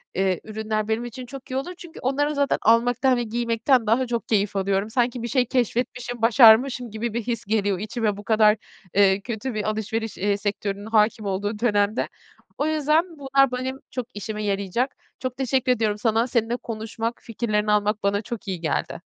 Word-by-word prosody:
eee, 190 -1 +1
ürünler 215 0 -3
benim 225 +2 -1
için 250 +2 -7
çok 260 +1 -10
iyi - - -2
olur 315 +7 -3
çünkü 345 -2 -11
onları 290 +3 0
zaten 280 -1 +2
almaktan 245 +3 +3
ve 240 - 0
giymekten 235 +1 +1
daha 250 +4 +2
çok 235 -1 -3
keyif 205 -2 +1
alıyorum. 195 +1 0
Sanki 245 0 0
bir - - -2
şey 255 0 +2
keşfetmişim, 245 -1 -2
başarmışım 240 +1 +6
gibi 220 +1 -3
bir 235 - -1
his 235 0 -3
geliyor 205 -3 0
içime 220 -1 -2
bu 205 - -9
kadar, 215 0 +4 0.4
eee, 195 -1 +4
kötü 235 +3 -4
bir 215 -1 -2
alışveriş, 220 +1 -3
eee, 200 +1 +1
sektörünün 205 0 -3
hâkim 215 -1 +2
olduğu 205 +2 -2
dönemde. 210 -1 +1 0.5
O 290 - 0
yüzden 310 +2 +2
bunlar 275 -1 +3
benim 260 +1 -3
çok 250 -3 -4
işime 210 +1 -5
yarayacak. 200 +5 -1 0.2
Çok 255 -1 -4
teşekkür 260 -1 +1
ediyorum 220 -4 +1
sana. 225 +2 +1
Seninle 235 -1 0
konuşmak, 225 0 -4
fikirlerini 215 -2 -1
almak 210 0 +1
bana 200 +1 +1
çok 225 0 -7
iyi 185 -3 -3
geldi. 155 -3 -2
225 Hz, 180 wpm, -24 LUFS, 210-250 Hz, 0.5 s, başarmışım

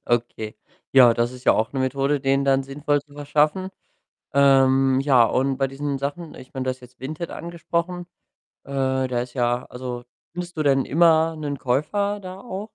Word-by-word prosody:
Okay. 115 -2 -2 0.4
Ja, 125 -3 +7
das 120 +1 0
ist 125 0 -12
ja - - +6
auch 110 +1 0
'ne 135 - -2
Methode, 135 +2 0
denen 135 0 +1
dann 135 0 +3
sinnvoll 145 +2 -1
zu 145 0 -23
verschaffen. 150 +5 +1 0.7
Ähm, 135 -1 +4
ja 135 -4 +5
und 130 +3 0
bei 135 0 +1
diesen 140 +1 -3
Sachen 145 +4 -5
ich 130 - -13
meine, 130 -1 -4
du - - 0
hast 130 0 -10
jetzt 125 0 -16
Vinted 155 +5 -5
angesprochen. 170 +1 -4 0.6
Äh, 140 - -9 0.3
da 125 -1 -1
ist 125 0 -8
ja 120 -1 0
also, 125 -1 -6 0.3
findest 175 0 -7
du 155 - 0
denn 135 -2 +3
immer 160 +1 +3
'nen 145 -2 -4
Käufer 200 +12 -1
da 185 -1 -9
auch? 200 -3 -6
140 Hz, 185 wpm, -23 LUFS, 130-155 Hz, 0.7 s, Ja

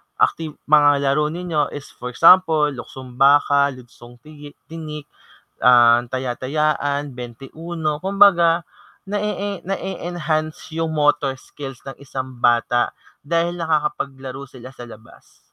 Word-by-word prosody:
acti 165 - +1 0.2
mga 145 -2 +5
laro 150 +2 +1
ninyo 160 -2 -2
is 145 - -9
for 125 - -9
example, 160 -3 +5
luksong 130 -1 -10
baka, 140 0 +4
luksong 120 -1 -15
tigi 150 -1 -13 0.2
tinik, 155 -2 -7 0.6
ah, 120 -1 +6
taya-tayaan, 140 +3 -2
bente-uno, 150 +6 -5
kumbaga 180 -3 +4 0.4
na-e-e 205 -1 -3
na-e-enhance 170 -6 -3
yung 165 0 -2
motor 145 -2 +1
skills 135 0 -10
ng 135 -1 -8
isang 130 -2 -7
bata 120 0 +2 0.4
dahil 170 +3 0
nakakapaglaro 140 -4 -3
sila 130 0 -12
sa 120 -2 -10
labas. 110 -1 -17
145 Hz, 110 wpm, -20 LUFS, 130-165 Hz, 0.6 s, ah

